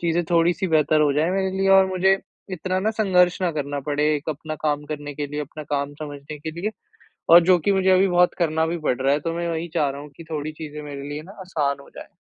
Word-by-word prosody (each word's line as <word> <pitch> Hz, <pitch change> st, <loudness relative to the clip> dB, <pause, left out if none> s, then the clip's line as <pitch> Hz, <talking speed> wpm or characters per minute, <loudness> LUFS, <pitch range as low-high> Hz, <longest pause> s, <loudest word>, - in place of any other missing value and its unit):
चीज़ें 170 Hz, 0 st, 0 dB
थोड़ी-सी 170 Hz, +2 st, +2 dB
बेहतर 155 Hz, -1 st, +3 dB
हो 145 Hz, -2 st, +3 dB
जाएँ 155 Hz, +5 st, +1 dB
मेरे 190 Hz, 0 st, 0 dB
लिए 195 Hz, 0 st, +2 dB
और 195 Hz, 0 st, +7 dB
मुझे 190 Hz, +1 st, +2 dB, 0.3 s
इतना 185 Hz, +2 st, -2 dB
न 220 Hz, -, 0 dB
संघर्ष 185 Hz, -4 st, +2 dB
ना 180 Hz, -, +2 dB
करना 145 Hz, -1 st, -3 dB
पड़े 150 Hz, +1 st, +2 dB
एक 150 Hz, +2 st, -4 dB
अपना 155 Hz, +1 st, -6 dB
काम 150 Hz, -1 st, 0 dB
करने 145 Hz, -1 st, -6 dB
के 145 Hz, 0 st, -3 dB
लिए 150 Hz, +1 st, -5 dB
अपना 150 Hz, +1 st, -7 dB
काम 140 Hz, 0 st, -2 dB
समझने 145 Hz, 0 st, -7 dB
के 160 Hz, +2 st, -5 dB
लिए 210 Hz, -, -1 dB, 0.6 s
और 170 Hz, +1 st, +10 dB
जो 180 Hz, 0 st, +5 dB
कि 200 Hz, +5 st, +1 dB
मुझे 190 Hz, -1 st, +2 dB
अभी 190 Hz, +1 st, +5 dB
बहुत 180 Hz, 0 st, +3 dB
करना 160 Hz, -2 st, +1 dB
भी 170 Hz, +1 st, -2 dB
पड़ 135 Hz, -5 st, -1 dB
रहा 135 Hz, +1 st, +3 dB
है। 145 Hz, -, +1 dB
तो 165 Hz, +2 st, -3 dB
मैं 170 Hz, 0 st, -2 dB
वही 165 Hz, +1 st, -3 dB
चाह 145 Hz, -4 st, +2 dB
रहा 140 Hz, -, -7 dB
हूँ 150 Hz, -, -11 dB
कि 165 Hz, -, -10 dB
थोड़ी 155 Hz, 0 st, -3 dB
चीज़ें 150 Hz, -1 st, -8 dB
मेरे 145 Hz, -2 st, -7 dB
लिए 150 Hz, +1 st, -5 dB
न 185 Hz, -, -14 dB, 0.2 s
आसान 140 Hz, -5 st, -1 dB
हो -, -, -16 dB
जाएँ। -, -, -9 dB
155 Hz, 255 wpm, -23 LUFS, 145-180 Hz, 0.6 s, और